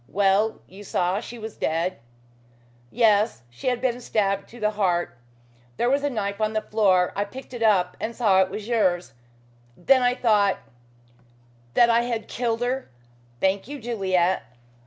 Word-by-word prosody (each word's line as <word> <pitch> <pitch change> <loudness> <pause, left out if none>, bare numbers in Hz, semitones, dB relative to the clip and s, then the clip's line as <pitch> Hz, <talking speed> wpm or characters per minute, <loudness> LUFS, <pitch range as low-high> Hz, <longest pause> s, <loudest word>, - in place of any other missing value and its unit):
"Well, 200 +4 +1
you 195 +3 -12
saw 185 0 0
she 240 +1 -9
was 220 -1 -8
dead?" 165 +1 -1 0.9
"Yes. 215 - +2
She 120 - -7
had 250 -1 +1
been 250 -1 -1
stabbed 200 -4 -1
to 240 - -13
the 210 -1 +1
heart. 185 -5 0 0.6
There 240 - +1
was 280 +1 +2
a 290 - +1
knife 200 -4 -3
on 215 0 0
the 215 - 0
floor. 190 -4 +2
I 200 - 0
picked 255 +6 -10
it 240 - -6
up 205 -5 +3
and 230 +1 -4
saw 200 -6 +4
it 190 - +1
was 210 +2 -6
yours. 185 - +1 0.6
Then 260 +9 +4
I 245 0 +2
thought 210 -6 +3 0.6
" 120 0 -32
"That 235 -1 +6
I 230 +1 +4
had 235 -2 -3
killed 235 -1 -2
her. 255 +2 -2 0.5
Thank 190 +2 0
you, 290 +1 -7
Juliet." 190 -6 0
210 Hz, 170 wpm, -24 LUFS, 190-235 Hz, 0.9 s, That